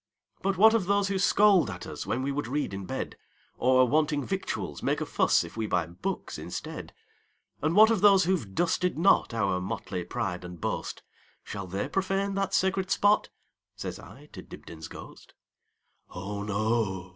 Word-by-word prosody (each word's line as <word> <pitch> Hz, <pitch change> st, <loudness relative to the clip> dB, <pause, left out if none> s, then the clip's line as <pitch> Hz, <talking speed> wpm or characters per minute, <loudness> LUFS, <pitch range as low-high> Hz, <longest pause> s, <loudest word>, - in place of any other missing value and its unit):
"But 195 Hz, 0 st, 0 dB
what 220 Hz, +3 st, +7 dB
of 215 Hz, -6 st, +1 dB
those 200 Hz, 0 st, +2 dB
who 195 Hz, -1 st, 0 dB
scold 195 Hz, -, +4 dB
at 90 Hz, -3 st, -7 dB
usWhen 125 Hz, +4 st, -3 dB
we 140 Hz, -, -1 dB
would 145 Hz, -2 st, -3 dB
read 145 Hz, -4 st, -2 dB
in 95 Hz, 0 st, -5 dB
bed? -, -, -5 dB, 0.4 s
Or, 130 Hz, 0 st, +4 dB
wanting 150 Hz, +1 st, +1 dB
victuals, 190 Hz, 0 st, -4 dB
make -, -, 0 dB
a -, -, -2 dB
fussIf -, -, +1 dB
we 110 Hz, -1 st, -2 dB
buy 90 Hz, -4 st, +1 dB
books 85 Hz, +2 st, -5 dB
instead? -, -, -6 dB, 0.7 s
And 155 Hz, +3 st, +1 dB
what 220 Hz, +2 st, +8 dB
of 220 Hz, -5 st, +1 dB
those 200 Hz, -2 st, +6 dB
who 185 Hz, +3 st, +2 dB
've 105 Hz, -, -7 dB
dusted 175 Hz, +1 st, +1 dB
notOur 115 Hz, -, +2 dB
motley 90 Hz, -1 st, -4 dB
pride 90 Hz, +1 st, -3 dB
and 90 Hz, -1 st, -9 dB
boast,—Shall 100 Hz, +4 st, -6 dB
they 95 Hz, +3 st, -3 dB
profane 195 Hz, +1 st, -1 dB
that 195 Hz, -1 st, -1 dB
sacred 190 Hz, 0 st, +1 dB
spot?"Says 205 Hz, +2 st, -1 dB
I -, -, -13 dB
to -, -, -8 dB
Dibdin's 80 Hz, -1 st, -10 dB
ghost."Oh, 100 Hz, +4 st, -11 dB
no! 105 Hz, -3 st, -1 dB
140 Hz, 155 wpm, -28 LUFS, -, 0.7 s, what